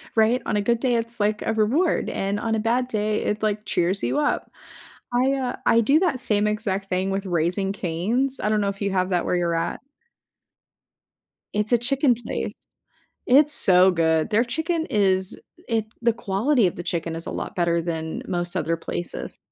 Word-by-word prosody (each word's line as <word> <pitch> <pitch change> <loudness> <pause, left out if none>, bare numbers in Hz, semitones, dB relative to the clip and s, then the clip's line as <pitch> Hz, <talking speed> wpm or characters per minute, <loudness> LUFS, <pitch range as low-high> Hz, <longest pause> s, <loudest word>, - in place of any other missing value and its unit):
Right? 225 +3 +3
On 210 - 0
a - - +1
good 235 +2 +1
day, 245 -2 +1
it's, 230 0 -3
like, 210 +1 +1
a 225 - 0
reward, 255 - +1
and 200 +1 -2
on 225 -1 -1
a - - 0
bad 240 +3 +1
day, 215 -2 -1
it, 210 +1 -2
like, 215 0 -1
cheers 180 +3 0
you 295 - 0
up. 295 - -1 0.6
I, 255 +2 +3
uh, 260 -2 -2
I 230 - +5
do 280 +8 +4
that 305 -9 0
same 210 -2 +1
exact 205 -2 -2
thing 185 +1 0
with 195 +1 -2
Raising 180 +3 0
Cane's, 210 +10 -1
I 210 - 0
don't 215 -1 +2
know 200 - +1
if 195 +1 -7
you 200 -1 0
have 185 0 0
that 175 -2 0
where - - 0
you're 170 -1 0
at. 165 +1 -2 1.7
It's 210 +3 -1
a 240 - +6
chicken 265 +1 +2
place. 240 - -4 0.7
It's 295 +3 +5
so 185 0 +5
good. 160 0 +1
Their 225 +2 +3
chicken 320 +6 -2
is 190 -2 +1 0.3
it 225 -2 0 0.2
the 235 -1 +3
quality 225 +2 +1
of - - -4
the 175 - -6
chicken 165 -1 -3
is 165 - -5
a - - -5
lot - - -5
better 170 -1 +1
than 160 -1 -4
most 175 -1 -3
other 165 0 0
places. 175 +1 -6
210 Hz, 195 wpm, -23 LUFS, 180-235 Hz, 1.7 s, a